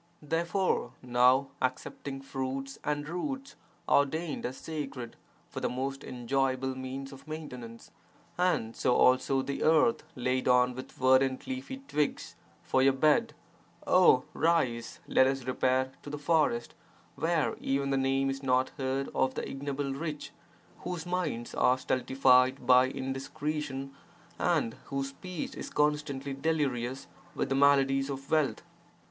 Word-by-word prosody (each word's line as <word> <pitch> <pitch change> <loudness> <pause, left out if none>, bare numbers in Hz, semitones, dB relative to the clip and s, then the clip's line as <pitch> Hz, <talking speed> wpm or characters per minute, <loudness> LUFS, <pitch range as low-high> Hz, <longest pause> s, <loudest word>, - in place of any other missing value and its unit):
Therefore, 165 -3 0
now, 125 +2 +4
accepting 135 +1 -3
fruits 135 0 -4
and 145 0 -2
roots, 270 - -4 0.3
ordained 150 +1 +1
as 130 - -7
sacred, 135 -7 -6 0.3
for - - -6
the - - -1
most 135 +2 -3
enjoyable 130 +1 -1
means 130 +1 -6
of 135 - -14
maintenance, 125 -7 -8 0.4
and 175 -11 0
(so 125 - +2
also) 130 +1 +4
the 140 - -4
earth 160 +9 +4
(laid 125 +1 -1
on) 125 0 +4
with 130 +1 -8
verdant 130 0 +3
leafy 265 0 -6
twigs 150 0 -1 0.3
for 130 - +2
your 135 0 +5
bed, 155 - +2 0.5
oh, 175 -8 +5
rise, 130 -9 0
let 130 - +5
us 135 -1 -1
repair 130 +1 +1
to - - -9
the 145 - -4
forest, 145 -5 +1 0.4
where 165 -1 0
even 140 0 0
the - - +2
name 135 0 +1
is 135 0 -5
not 130 -1 +2
heard 135 +1 -1
of 130 0 +1
the - - -3
ignoble 140 0 -3
rich 150 +1 -5 0.5
whose 175 -2 -5
minds 175 -10 -2
are 125 - +3
stultified 130 0 +3
by 125 0 +6
indiscretion 135 +1 -4 0.5
and 155 -10 +1
whose 135 0 -3
speech 175 +4 -6
is - - -7
constantly 150 -2 0
delirious 135 -4 -1 0.3
with - - -1
the 135 - +1
maladies 135 -1 +4
of 135 0 -6
wealth. 155 -3 +1
135 Hz, 135 wpm, -30 LUFS, 130-150 Hz, 0.5 s, by